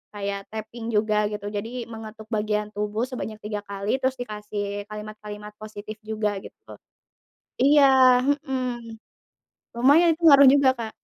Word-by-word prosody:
kayak 200 -1 -3
tapping 220 +1 -7
juga 215 0 +2 0.2
gitu, 205 -1 -6
jadi 220 +3 -4 0.2
mengetuk 220 -1 -9
bagian 210 0 -1
tubuh 210 +2 -2
sebanyak 220 -4 -5
3 210 -1 -3
kali 200 +1 -5
terus 260 0 0
dikasih 210 -2 -5 0.3
kalimat-kalimat 210 0 -8
positif 215 0 -8
juga 215 -1 0
gitu. - - -13 1.0
Iya, 285 +2 +6 0.4
mhm, 270 -2 -1 1.1
lumayan 285 +8 +5
sih 340 - -15
ngaruh 280 -3 +9
juga 280 -2 +5
Kak. 225 -1 -4
215 Hz, 130 wpm, -24 LUFS, 210-255 Hz, 1.1 s, ngaruh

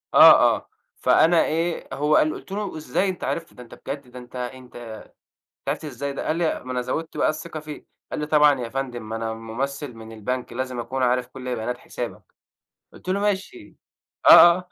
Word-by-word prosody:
آه، - - +10 0.2
آه - - -10 0.3
فأنا 165 +1 +4
إيه 165 +1 -1
هو 150 +2 +2
قال 155 0 +3
قُلت - - -11
له: 200 -3 -4
"إزاي 155 +6 0
أنت 185 - -5
عرفت؟ 165 -1 -3
ده 125 - -11
أنت 120 - -15
بجد 140 -2 -5
ده 125 - -9
أنت 125 +1 -14
أنت 125 0 -7
أنت 115 -2 -8 0.7
عرفت - - -2
ازاي 140 0 -4
ده؟" - - -5
قال 155 - +1
لي 165 -1 -1
ما 130 - -6
أنا 125 -1 -1
زوّدت 160 +6 -4
بقى - - +3
الثقة 155 +1 -5
فيه، 150 -1 -9 0.3
قال - - -3
لي: 150 - -2
"طبعًا 150 -2 +4
يا 115 - -4
فندم 120 -4 -5
ما 110 - -3
أنا 115 0 -3
ممثل 125 +5 -5
من 110 0 -11
البنك، 120 +3 -4
لازم 130 0 -3
اكون 130 +3 -3
عارف 125 0 +1
كل 125 -1 -5
بيانات 120 +3 -3
حسابك." - - -7 0.7
قُلت - - -14
له: 190 +2 +1
"ماشي" 205 - -3 0.5
آه، - - +7
آه، 170 0 +10
135 Hz, 205 wpm, -23 LUFS, 125-155 Hz, 0.7 s, آه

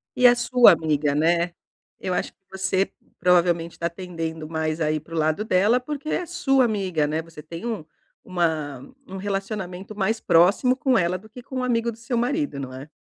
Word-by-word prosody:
E 250 - +3
é 245 0 +8
sua 245 -2 +6
amiga, 150 -3 +1
né. 170 +2 +2 0.5
Eu 185 - -2
acho - - -2
que - - -56
você 190 0 0 0.3
provavelmente 170 -1 +2
tá 170 0 -1
tendendo 165 -3 -5
mais 160 0 -2
a 155 -1 +1
ir 155 - 0
para 165 +1 -14
o - - -2
lado 155 +6 +1
dela, 210 +5 +3
porque 295 +3 -6
é - - 0
a - - -5
sua 295 -7 +2
amiga, 190 -8 0
né? 155 +2 -1
Você 160 -2 -12
tem 165 +7 -8
um 220 -10 -3 0.4
uma 160 -6 -1 0.3
um 190 - -7
relacionamento 195 0 -4
mais 220 +3 0
próximo 195 +10 +4
com 260 -2 +2
ela 180 -1 +1
do 215 +4 -16
que 245 +3 -11
com 260 0 -5
o - - -1
amigo 235 -1 +1
do 220 - -13
seu 235 +1 -3
marido, 280 - -1
não 130 -1 -6
é? 135 +3 -9
185 Hz, 205 wpm, -24 LUFS, 160-230 Hz, 0.5 s, é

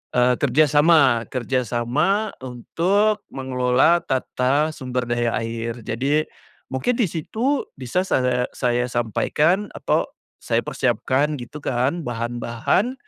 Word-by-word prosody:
eee, 125 0 +4
kerja 140 +2 +4
sama 145 -6 +4
kerja 130 0 -1
sama 150 - 0 0.2
untuk 195 - 0
mengelola 130 +5 +2
tata 135 +3 0
sumber 125 -2 -3
daya 120 -1 0
air 115 +1 -4
jadi, 140 +7 0 0.5
mungkin 130 - 0
di 235 - +3
situ 225 - -1
bisa 135 +9 -2
saya 125 -6 +1
saya 125 -1 0
sampaikan 150 - +1
atau, - - 0 0.3
saya - - 0
persiapkan 145 +3 0
gitu 120 +5 -9
kan 135 +5 -1
bahan-bahan, 120 - -1
130 Hz, 115 wpm, -22 LUFS, 120-160 Hz, 0.5 s, eee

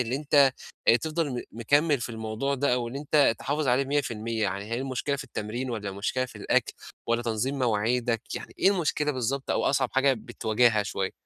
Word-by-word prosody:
إن 125 0 -1
أنت 140 -1 +4 0.4
آآ 115 - +8
تفضَل 160 +1 -2
م 125 - -3
مكمّل 145 +6 +2
في 120 - -3
الموضوع 110 +4 -2
ده، 140 0 +1
أو 120 -1 -2
إن 125 - -6
أنت 145 -3 +3
تحافظ 145 0 -1
عليه 125 +3 +3
100%، 115 -5 -2
يعني 100 0 -1
هي 115 - -1
المشكلة 135 +2 -2
في 140 - -6
التمرين، 120 +1 -4
والّا 105 -4 -3
مشكلة 115 +6 -1
في - - -13
الأكْل، - - +1 0.3
والّا 115 0 +1
تنظيم 120 +4 -1
مواعيدك؟ 115 0 +1
يعني - - -7
إيه 195 - +5
المشكلة 150 -5 0
بالضبط، 130 +2 -2
أو - - +1
أصعب 135 -2 +2
حاجة 135 +1 +4
بتواجهها 110 -1 +1
شويّة؟ 100 -1 -2
125 Hz, 190 wpm, -27 LUFS, 115-140 Hz, 0.4 s, آآ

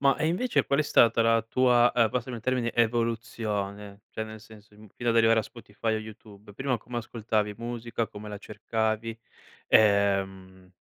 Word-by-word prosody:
Ma 140 -1 +4
e 155 - 0
invece 195 +10 +1
qual 140 - 0
è - - +4
stata 115 -5 +4
la 115 0 +3
tua, 120 +1 +3
uhm, 115 -2 +4
passami 125 -1 -3
il 115 - -10
termine, 125 -2 0
evoluzione? 110 -3 -2
Cioè, 110 - -4
nel 110 0 -10
senso, 110 -1 -17
im 105 0 -16
fino 120 -1 -3
ad 115 - +1
arrivare 115 0 +5
a - - -6
Spotify 110 -1 -4
o - - -1
YouTube. 105 -1 -12
Prima 135 -1 -1
come 120 0 -6
ascoltavi 110 -2 -2
musica, 115 -1 -4
come 105 +1 -10
la 105 - -7
cercavi? 110 +2 -3 0.5
Ehm, 95 -3 +2
110 Hz, 175 wpm, -27 LUFS, 105-120 Hz, 0.5 s, arrivare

